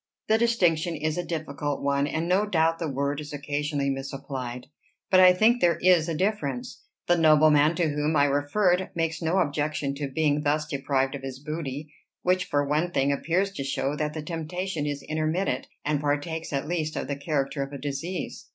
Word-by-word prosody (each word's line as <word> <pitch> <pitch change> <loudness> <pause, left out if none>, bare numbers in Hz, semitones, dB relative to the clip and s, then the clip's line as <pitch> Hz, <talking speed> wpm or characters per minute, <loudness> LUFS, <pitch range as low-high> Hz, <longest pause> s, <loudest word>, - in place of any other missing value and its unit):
"The 220 +1 +4
distinction 175 -8 +2
is 155 0 -1
a - - -1
difficult 150 -3 -3
one, 140 0 +1
and 160 +3 -2
no 195 +4 +2
doubt 165 -3 +2
the 165 - -2
word 140 +1 -1
is 150 - -8
occasionally 145 -1 -2
misapplied. 135 -2 -5 0.5
But 185 - +6
I 185 0 +9
think 220 +6 +3
there 170 -2 +4
is 175 -2 +4
a 165 - -1
difference. 150 - -2 0.2
The 175 - +4
nobleman 155 0 +5
to 165 -1 +1
whom 150 +2 0
I 145 -1 +5
referred 175 +7 +1
makes 165 0 -1
no 165 +3 +1
objection 145 -3 0
to 145 -1 -2
being 150 +1 +1
thus 150 0 +1
deprived 135 -2 -1
of 140 - -5
his 135 -1 -6
booty; 150 0 -5 0.3
which, 185 0 +2
for 145 -3 0
one 155 +4 +1
thing, 140 -5 +1
appears 175 +7 0
to 140 - -5
show 135 +1 -1
that 150 0 -2
the 155 - -4
temptation 165 0 -3
is 145 -1 -4
intermittent, 155 -2 -1 0.2
and 145 -1 0
partakes 150 +3 -2
at 140 0 -2
least 155 -2 -2
of - - -3
the 140 - -2
character 140 -1 -2
of 135 0 -4
a 140 - -6
disease." 145 +6 -5
150 Hz, 190 wpm, -26 LUFS, 140-170 Hz, 0.5 s, I